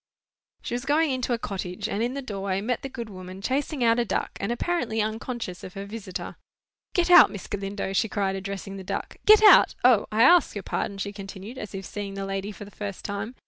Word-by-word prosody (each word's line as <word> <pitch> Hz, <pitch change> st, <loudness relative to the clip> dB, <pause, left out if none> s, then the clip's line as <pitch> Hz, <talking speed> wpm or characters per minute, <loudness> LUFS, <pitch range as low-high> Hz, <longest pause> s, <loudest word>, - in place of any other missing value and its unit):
She -, -, -4 dB
was 245 Hz, 0 st, -2 dB
going 295 Hz, +2 st, +2 dB
into 255 Hz, -1 st, -2 dB
a 240 Hz, -, +2 dB
cottage, 185 Hz, -5 st, -4 dB
and 205 Hz, -, -2 dB
in 245 Hz, +3 st, -1 dB
the 280 Hz, -, -4 dB
doorway 195 Hz, -4 st, -2 dB
met 230 Hz, +4 st, -2 dB
the 270 Hz, -, -5 dB
good 235 Hz, -3 st, -6 dB
woman 185 Hz, -2 st, -9 dB
chasing 265 Hz, +5 st, -1 dB
out 230 Hz, 0 st, +4 dB
a -, -, +3 dB
duck, 235 Hz, -, -2 dB
and 200 Hz, -, -1 dB
apparently 240 Hz, -4 st, -1 dB
unconscious 220 Hz, -3 st, -3 dB
of 185 Hz, -, -9 dB
her 195 Hz, 0 st, -5 dB
visitor. 200 Hz, -3 st, -7 dB, 0.6 s
"Get 355 Hz, 0 st, +2 dB
out, 355 Hz, -, +9 dB
Miss 200 Hz, -, -8 dB
Galindo!" 195 Hz, -1 st, -4 dB
she 215 Hz, +3 st, +1 dB
cried, 195 Hz, -2 st, -1 dB
addressing 195 Hz, 0 st, -6 dB
the 190 Hz, -, -7 dB
duck. -, -, -5 dB
"Get 430 Hz, 0 st, +8 dB
out! 420 Hz, -, +8 dB
O, 245 Hz, -5 st, +5 dB
I 220 Hz, +2 st, +4 dB
ask 345 Hz, 0 st, +5 dB
your 205 Hz, -, -4 dB
pardon," 200 Hz, -, -3 dB
she 200 Hz, +1 st, -4 dB
continued, 200 Hz, +4 st, -8 dB
as 210 Hz, -1 st, -7 dB
if 195 Hz, 0 st, -6 dB
seeing 200 Hz, 0 st, -6 dB
the 195 Hz, 0 st, -4 dB
lady 195 Hz, +1 st, -3 dB
for 205 Hz, 0 st, -9 dB
the 205 Hz, -, -13 dB
first 200 Hz, -2 st, -6 dB
time. 205 Hz, +4 st, -4 dB
205 Hz, 225 wpm, -26 LUFS, 195-245 Hz, 0.6 s, out